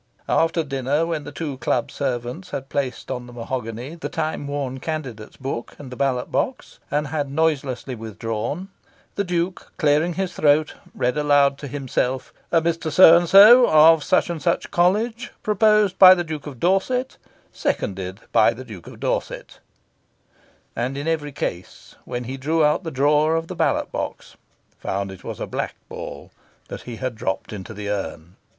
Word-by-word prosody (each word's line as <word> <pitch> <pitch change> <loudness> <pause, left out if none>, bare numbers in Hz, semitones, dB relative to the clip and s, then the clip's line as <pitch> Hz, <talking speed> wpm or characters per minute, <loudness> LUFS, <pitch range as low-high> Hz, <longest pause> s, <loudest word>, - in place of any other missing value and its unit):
After 165 0 +2
dinner, 140 +2 0
when 165 -3 -3
the 145 - -7
two 145 -3 -5
club 120 0 -1
servants 130 +6 -4
had 135 -4 -6
placed 135 -3 -3
on 125 -1 -5
the 120 - -12
mahogany 120 +2 -5
the 170 - -6
time 155 -2 -3
worn 140 -2 -3
Candidates' 130 -9 -6
Book 130 -3 -5
and 135 -3 -10
the - - -6
ballot 130 -2 -1
box, - - -2
and 150 0 -1
had 145 -2 -2
noiselessly 140 -4 -1
withdrawn, 115 - -4 0.4
the 200 - -1
Duke, 180 0 -3
clearing 155 +2 +2
his 190 -1 -2
throat, 150 +1 +3 0.2
read 125 +4 0
aloud 145 -1 +3
to 145 - -6
himself 130 -1 -2 0.2
"Mr. 165 -1 +1
So 170 0 +9
and 170 0 +2
So, 230 +6 +9
of 155 0 +6
Such 185 -1 +2
and 165 -3 -5
Such 170 - 0
College, 220 +7 +1
proposed 210 -2 +3
by 185 -1 +10
the 175 - -1
Duke 155 -3 -6
of 135 -5 -9
Dorset, 220 - 0 0.4
seconded 95 +1 -3
by 115 - +4
the 130 +2 -9
Duke 100 -9 -11
of - - -11
Dorset," - - -3 1.2
and, 125 +4 -2
in 145 +3 -4
every 155 -3 -1
case, 90 -8 -6
when 120 0 -4
he 130 +3 -6
drew 155 +4 +1
out 150 +5 +2
the 165 - -4
drawer 150 +3 +2
of 165 0 -1
the - - -7
ballot - - 0
box, - - -5 0.4
found 100 0 -3
it 95 -1 -12
was - - -6
a - - -3
black - - -4
ball - - -8 0.4
that - - -7
he 120 - -5
had 130 +1 -3
dropped 110 -1 -4
into 105 +2 -7
the 105 0 -6
urn. 90 -3 -5
145 Hz, 170 wpm, -22 LUFS, 125-165 Hz, 1.2 s, by